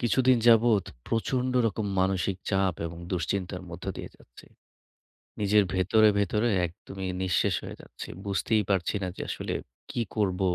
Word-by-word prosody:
কিছুদিন 130 +1 +4
যাবত 115 -3 +6 0.2
প্রচন্ড 125 +3 0
রকম 110 0 -2
মানসিক 95 0 +1
চাপ 95 -2 +2
এবং 85 +1 -8
দুশ্চিন্তার 90 +2 -2
মধ্য 85 0 -8
দিয়ে - - -7
যাচ্ছে। - - -17 0.9
নিজের 105 0 +4
ভেতরে, 100 +4 +4
ভেতরে 105 +4 +1 0.2
একদমই 95 +2 -7
নিঃশেষ 90 -2 +2
হয়ে - - -8
যাচ্ছি। - - -10 0.2
বুঝতেই 100 +3 +1
পারছি 95 0 +1
না 95 - -1
যে - - -5
আসলে - - -3 0.4
কী 120 - -1
করব, 100 -3 +1
100 Hz, 140 wpm, -28 LUFS, 95-110 Hz, 0.9 s, যাবত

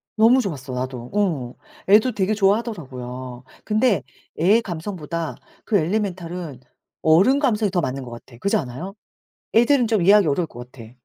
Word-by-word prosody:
너무 235 +4 +5
좋았어 140 - -5
나도. 125 -1 -5
어 165 -12 -1 0.4
애도 220 +4 +5
되게 200 +1 0
좋아하더라고요. 130 - -2 0.2
근데 215 - +1 0.4
애의 205 +8 +4
감성보다 170 -3 -5 0.3
그 210 - +2
엘리멘탈은 175 - -3 0.4
어른 190 - +4
감성이 225 -7 +1
더 180 -2 +1
맞는 135 0 -3
것 120 - -10
같아. 120 0 -12
그렇지 200 - +1
않아요? 165 +9 -6 0.6
애들은 240 +1 +4
좀 220 -4 +1
이해하기 200 +1 +5
어려울 155 +3 0
것 120 -1 -11
같아. 115 -3 -12
175 Hz, 350 characters per minute, -22 LUFS, 130-210 Hz, 0.6 s, 너무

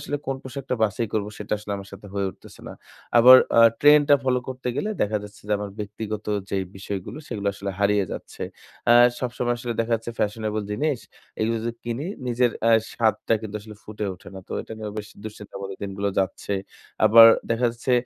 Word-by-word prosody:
আসলে 145 - -3
কোন 135 - -1
পোশাকটা 130 0 -4
বাছাই 110 +2 +1
করব 105 -1 0
সেটা 105 0 -2 0.2
আমার 100 0 -9
সাথে 105 - -11
হয়ে 100 -1 0
উঠতেছে - - -16
না। - - -7 0.5
আবার 125 +2 +10 0.2
আ - - +9 0.2
ট্রেন্ড 145 0 +7
টা 145 - +8
ফলো 130 -1 +2
করতে 130 -1 -5
গেলে 210 - -1
দেখা 105 +1 0
যাচ্ছে 105 0 -12
যে - - +1
আমার 105 -1 -5
ব্যক্তিগত 105 +1 -5 0.3
যে 100 - 0 0.2
বিষয়গুলো 95 +6 -6
সেগুলো 100 -4 -4
আসলে 100 0 -4
হারিয়ে 100 -1 +3
যাচ্ছে। - - -8 0.5
আ - - +9 0.3
সবসময় 120 -1 -1
আসলে 120 -1 -3
দেখা 115 +1 -1
যাচ্ছে 115 +1 -4
ফ্যাশনেবল 105 0 -1
জিনিস 145 +3 -1 0.4
এগুলো 115 +1 +1
যদি 120 - -1
কিনি 120 +5 -3 0.2
নিজের 120 0 +2 0.2
আ - - +5 0.2
স্বাদটা 115 0 +1
কিন্তু 105 -1 -6
আসলে 105 0 -12
ফুটে 105 0 -6
ওঠে 90 - -14
না। 95 - -7
তো - - -7
এটা - - -10
নিয়ে 110 -1 -5
বেশ 105 - -6 0.2
দুশ্চিন্তা 105 -1 -9
মত 95 - -5
দিনগুলো 100 0 -2
যাচ্ছে। 95 +1 -1 0.5
আবার 115 +1 +10 0.2
দেখা 115 +1 +2
যাচ্ছে 120 +2 -3
110 Hz, 195 wpm, -24 LUFS, 105-120 Hz, 0.5 s, আবার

